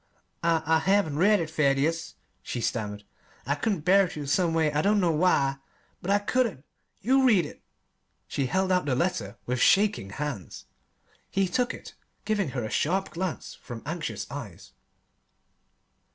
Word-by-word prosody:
"I 165 -1 +2
I 160 +1 +3
haven't 180 -4 +1
read 205 +3 +5
it, 160 -2 -3
Thaddeus," 155 +2 +1 0.3
she 120 - -4
stammered. 105 -3 -3 0.4
"I 140 - +1
couldn't 195 +2 -1
bear 195 +1 +5
to, 150 -3 -6
someway. 165 0 +2
I 150 0 +1
don't 205 +3 +3
know 175 -3 +2
why, 150 -4 +2 0.4
but 180 - -5
I 200 - +5
couldn't. 205 - -1 0.4
You 265 +5 +3
read 210 - +4
it!" - - -11 0.7
She 135 - -1
held 190 +8 0
out 180 -3 +2
the 135 -3 +1
letter 120 - -1
with 125 0 -1
shaking 200 - +3
hands. 125 -3 -5 0.6
He 195 -1 +1
took 245 +7 0
it, - - -10 0.3
giving 205 -7 0
her 120 - -1
a 110 - -4
sharp 190 +5 0
glance 180 0 -4
from 120 -2 -8
anxious 150 - -4
eyes. - - -8
165 Hz, 155 wpm, -27 LUFS, 140-195 Hz, 0.7 s, read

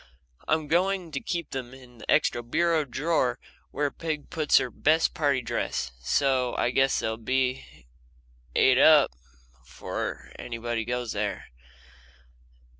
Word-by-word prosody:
I'm 155 -1 +1
going 180 +1 +1
to - - -3
keep 175 -8 -4
them 130 -1 -6
in 125 -3 -16
the - - -12
extra 120 - +3
bureau 160 +6 +1
drawer 135 -2 0 0.3
where 145 -1 -1
Peg 155 -3 -5
puts 155 -2 +3
her 125 - 0
best 160 +2 +2
party 140 -4 +1
dress, 60 - -2
so 130 - +1
I 120 - +1
guess 135 +1 +2
they'll 110 0 -2
be 130 - -2 0.7
et 130 0 +5
up 150 -2 +6 0.5
before - - -6
anybody 115 -1 -3
goes 120 -1 -2
there. 105 -1 -3
130 Hz, 130 wpm, -27 LUFS, 120-155 Hz, 0.7 s, up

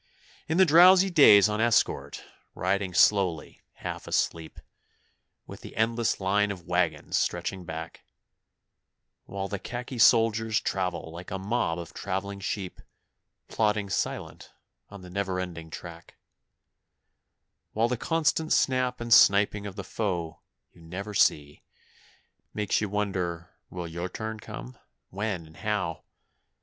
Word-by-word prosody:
In 160 - 0
the 190 - +7
drowsy 180 +4 +7
days 110 - +7
on 105 +1 -1
escort, 115 -1 +1 0.3
riding 95 +1 -1
slowly 90 -3 +2
half - - -7
asleep, 80 -1 -2 0.9
With - - -11
the - - -11
endless 115 +1 0
line 100 +2 +1
of 90 -4 -7
waggons - - 0
stretching 95 -2 -3
back, 80 0 -7 1.2
While 95 0 -5
the 100 0 -5
khaki 120 +4 -6
soldiers 115 -1 +4
travel 90 -4 -3
like 85 +2 -9
a 95 - -3
mob 95 -4 -1
of 85 -1 -8
travelling 100 +1 -4
sheep, 95 -1 -5 0.7
Plodding 105 -2 0
silent - - -4 0.4
on 100 -2 -11
the 90 - -11
never 95 -1 -2
ending 85 -3 -6
track, - - -10 1.6
While 115 +2 +2
the 125 - -1
constant 160 +3 0
snap 130 -2 +1
and 120 -1 +2
sniping 100 -1 +5
of 95 - -8
the - - -6
foe 90 -7 -3 0.3
you 85 - -20
never 95 +6 -7
see 75 -6 +1 0.9
Makes 105 -1 0
you 105 - -2
wonder 90 -4 -3 0.2
will 90 -2 -6
your 85 +2 -5
turn 110 +1 -6
come 60 -10 -9 0.3
when 100 -3 -3
and 80 0 -17
how? 100 -6 -3
100 Hz, 130 wpm, -27 LUFS, 90-110 Hz, 1.6 s, the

